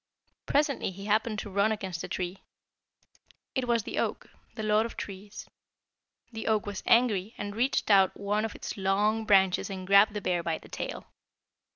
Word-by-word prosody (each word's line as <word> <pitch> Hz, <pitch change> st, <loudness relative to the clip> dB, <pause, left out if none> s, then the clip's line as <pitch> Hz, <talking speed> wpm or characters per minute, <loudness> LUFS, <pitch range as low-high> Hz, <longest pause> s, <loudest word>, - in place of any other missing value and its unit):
Presently 285 Hz, -5 st, +1 dB
he 195 Hz, +1 st, -9 dB
happened 215 Hz, +1 st, +1 dB
to 210 Hz, -, -5 dB
run 200 Hz, +3 st, +2 dB
against 190 Hz, -6 st, -4 dB
a -, -, -4 dB
tree. 180 Hz, +1 st, -4 dB, 1.1 s
It 260 Hz, -2 st, -1 dB
was 235 Hz, -2 st, +2 dB
the -, -, -3 dB
oak, -, -, -3 dB, 0.2 s
the 220 Hz, -, -5 dB
lord 215 Hz, +1 st, +3 dB
of 230 Hz, -, -7 dB
trees. 200 Hz, +1 st, -8 dB, 0.8 s
The 225 Hz, -1 st, -6 dB
oak 215 Hz, -2 st, +2 dB
was 205 Hz, -2 st, -5 dB
angry 225 Hz, -3 st, +3 dB
and 205 Hz, 0 st, -5 dB
reached 245 Hz, -1 st, +1 dB
out 195 Hz, -1 st, +5 dB
one 205 Hz, +1 st, 0 dB
of 220 Hz, -, -4 dB
its -, -, -6 dB
long 205 Hz, +3 st, +1 dB
branches 190 Hz, -2 st, +3 dB
and 190 Hz, -1 st, -6 dB
grabbed 200 Hz, +2 st, +5 dB
the -, -, -1 dB
bear 180 Hz, -2 st, 0 dB
by 165 Hz, -1 st, -2 dB
the -, -, -16 dB
tail. -, -, -5 dB
205 Hz, 180 wpm, -29 LUFS, 195-220 Hz, 1.1 s, out